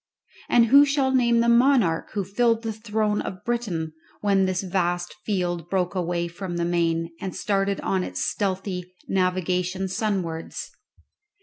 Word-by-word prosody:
And 235 -1 +5
who 280 +5 +7
shall 275 -2 +1
name 235 -2 +4
the 235 - +2
monarch 235 -8 +4
who 205 - -1
filled 230 +3 +1
the 225 -1 -2
throne 215 -1 -1
of 185 +3 -7
Britain 195 -10 -2 0.3
when 195 -2 +3
this 185 0 -1
vast 175 -1 -1
field 175 -4 -1
broke 180 -2 0
away 175 -2 -1
from 175 +1 -5
the 170 - 0
main 165 -1 0
and 190 - -4
started 200 -1 0
on 190 -1 0
its - - -5
stealthy 185 -2 -3
navigation 185 0 0
sunwards? 185 -5 -3
190 Hz, 145 wpm, -24 LUFS, 175-220 Hz, 0.3 s, who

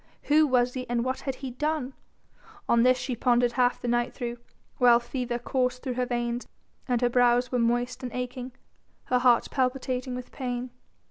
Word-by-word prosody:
Who 305 +1 +4
was 250 -2 +2
he 255 -2 -5
and 240 0 0
what 260 0 -1
had 270 -2 -4
he 260 - -4
done? 295 0 -2 0.7
On 235 - +4
this 255 +1 +5
she 255 0 -3
pondered 245 0 +2
half 245 0 +1
the - - -5
night 240 0 0
through, 240 -2 -5 0.4
while 240 -1 +6
fever 240 0 -3
coursed 250 0 -1
through 255 - -2
her 250 0 -1
veins 240 0 -2 0.4
and 245 -2 +1
her 245 - +4
brows 245 0 +3
were 250 - +1
moist 240 +1 0
and 250 -2 -5
aching, 250 +1 -5 0.5
her 250 - +1
heart 245 -2 +4
palpitating 255 -1 -1
with 250 0 -7
pain. 250 -1 -4
250 Hz, 185 wpm, -27 LUFS, 240-255 Hz, 0.7 s, while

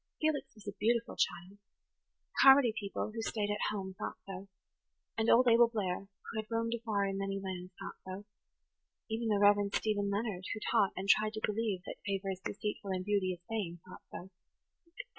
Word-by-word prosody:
Felix 295 -3 0
was 215 -1 -15
a - - -1
beautiful 235 +2 +1
child. 175 +5 -1 0.8
Carmody 270 -4 +8
people, 205 0 -3
who 225 - -3
stayed 210 -2 -1
at 205 - 0
home, 190 -2 -4
thought - - -4
so; 195 0 -7 0.7
and 225 0 +1
old 250 +2 +6
Abel 235 0 +7
Blair, 195 -3 -2 0.2
who 220 - -3
had 215 - -5
roamed 230 0 0
afar 220 -4 0
in 195 0 -2
many 195 0 -2
lands, 185 -1 -5
thought - - -7
so; 185 - -7
and 195 +2 -7 0.9
even 225 +1 -1
the 210 -2 +3
Rev. 205 0 +6 0.2
Stephen 205 -2 +1
Leonard, 200 -3 -2
who - - -5
taught, 210 -4 +3
and 190 +1 -4
tried 215 +2 +4
to 215 - -5
believe, 210 -4 -1
that - - -6
favour 195 -1 -1
is 185 - -5
deceitful 205 +1 -4
and 185 -1 -2
beauty 200 -3 +1
is 175 - -11
vain, 190 -7 -3
thought 185 - -11
so. 190 +2 -9
205 Hz, 190 wpm, -33 LUFS, 195-225 Hz, 0.9 s, Carmody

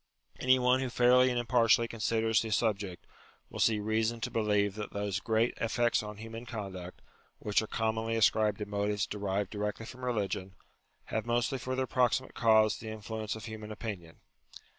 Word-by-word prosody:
Any 130 0 +4
one 125 +1 +3
who 130 -1 -2
fairly 125 +1 +5
and 125 - -1
impartially 120 -1 +3
considers 115 -1 +1
the 115 - -4
subject, 100 -5 -1 0.5
will - - -7
see 110 -2 +3
reason 110 +2 0
to 125 - -3
believe 105 -3 +1
that 105 0 -6
those 100 -1 -2
great 115 +2 +1
effects 120 +1 +1
on 105 -1 -8
human 115 +2 -8
conduct, 95 -6 -7 0.3
which 105 0 +1
are 110 - -5
commonly 110 +1 -1
ascribed 110 -2 +3
to 105 - -4
motives 105 0 -1
derived 100 -1 -2
directly 105 +1 -3
from 125 +3 -10
religion, 100 -6 -2 0.6
have 110 +1 -1
mostly 120 +2 0
for 130 +2 -3
their 130 0 0
proximate 130 +1 +1
cause 110 -2 +4
the 110 - -7
influence 110 0 -5
of 110 - -8
human 110 -1 -7
opinion. 100 -7 -7
110 Hz, 170 wpm, -31 LUFS, 105-120 Hz, 0.6 s, fairly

